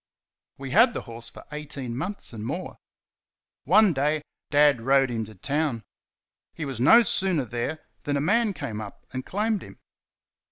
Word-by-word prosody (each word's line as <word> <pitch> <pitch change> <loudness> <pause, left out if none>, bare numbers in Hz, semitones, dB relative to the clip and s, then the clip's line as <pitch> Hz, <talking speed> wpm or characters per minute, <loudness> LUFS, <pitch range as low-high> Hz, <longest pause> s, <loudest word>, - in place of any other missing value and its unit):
We 135 -1 -7
had 230 +4 +6
the - - -3
horse 115 -1 -5
for - - -13
eighteen 145 -5 -5
months 180 +3 -4
and 110 -2 -6
more. - - -5 0.9
One 200 +4 +5
day 150 +2 0 0.3
Dad 145 -4 +4
rode 135 +1 +3
him 115 -2 -2
to 110 0 -13
town. 140 - -1 0.7
He 160 - -4
was 135 -4 -5
no 230 - +7
sooner 185 - +1
there 120 +7 -4 0.2
than 145 -1 0
a - - 0
man 205 +8 +2
came 115 - -5
up 105 -2 -10
and 130 0 -3
claimed 210 +4 -1
him. - - -12
145 Hz, 165 wpm, -26 LUFS, 120-180 Hz, 0.9 s, no